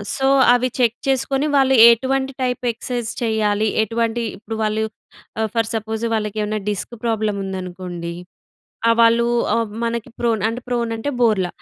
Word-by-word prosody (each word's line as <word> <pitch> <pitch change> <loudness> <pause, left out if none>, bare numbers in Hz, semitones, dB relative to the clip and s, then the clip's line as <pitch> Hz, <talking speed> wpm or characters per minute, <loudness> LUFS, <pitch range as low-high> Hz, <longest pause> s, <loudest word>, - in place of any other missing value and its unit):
So, 270 - +1 0.3
అవి 250 +1 +1
check 235 -1 +2
చేసుకొని 270 +1 +1
వాళ్ళు 265 -1 +4 0.2
ఎటువంటి 265 +3 0
టైప్ 250 -1 -2
ఎక్సైజ్ 240 -1 -4
చేయాలి. 215 -1 +1 0.2
ఎటువంటి 230 +2 -1 0.2
ఇప్పుడు 220 +2 -6
వాళ్ళు 215 0 0 0.6
ఆహ్, 220 0 0
ఫర్ 225 -1 +1
సపోజ్ 220 +1 -3
వాళ్ళకి 210 -1 -2
ఏమన్నా 215 +1 -2
డిస్క్ 205 +4 -5
ప్రాబ్లమ్ 215 -3 0
ఉందనుకోండి. 180 -2 -6 0.8
ఆ! - - +7
వాళ్ళు 230 +1 +4 0.3
ఆహ్, 230 -2 0 0.2
మనకి 230 -1 -3
ప్రోన్ 230 -3 +1
అంటే 235 +2 -5
ప్రోన్ 240 -1 -1
అంటే, 255 +6 -3
బోర్ల. 210 -6 +3
225 Hz, 150 wpm, -20 LUFS, 215-240 Hz, 0.8 s, ఆ